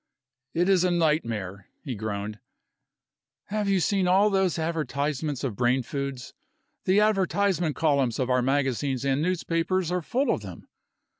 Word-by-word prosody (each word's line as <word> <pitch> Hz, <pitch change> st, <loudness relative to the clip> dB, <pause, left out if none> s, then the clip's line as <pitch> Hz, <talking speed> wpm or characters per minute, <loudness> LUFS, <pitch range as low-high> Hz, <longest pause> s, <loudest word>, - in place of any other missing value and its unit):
"It 175 Hz, +2 st, +2 dB
is 190 Hz, -2 st, +4 dB
a 180 Hz, -, +3 dB
nightmare!" 115 Hz, -, -1 dB, 0.2 s
he 135 Hz, -, -4 dB
groaned. 105 Hz, -1 st, -4 dB, 1.1 s
"Have 210 Hz, -1 st, -1 dB
you 195 Hz, -1 st, +3 dB
seen 190 Hz, +1 st, +1 dB
all 195 Hz, +3 st, +4 dB
those 190 Hz, -3 st, +1 dB
advertisements 150 Hz, -3 st, -2 dB
of 125 Hz, -7 st, -2 dB
brain 125 Hz, +2 st, +2 dB
foods? 135 Hz, -2 st, -5 dB, 0.5 s
The 190 Hz, +2 st, +4 dB
advertisement 195 Hz, -5 st, +1 dB
columns 140 Hz, -7 st, +1 dB
of 130 Hz, -, 0 dB
our 125 Hz, 0 st, +2 dB
magazines 135 Hz, 0 st, 0 dB
and 135 Hz, +1 st, +1 dB
newspapers 175 Hz, +1 st, 0 dB
are 180 Hz, 0 st, 0 dB
full 250 Hz, -, 0 dB
of -, -, -1 dB
them. 95 Hz, -4 st, -10 dB
155 Hz, 145 wpm, -26 LUFS, 125-185 Hz, 1.1 s, is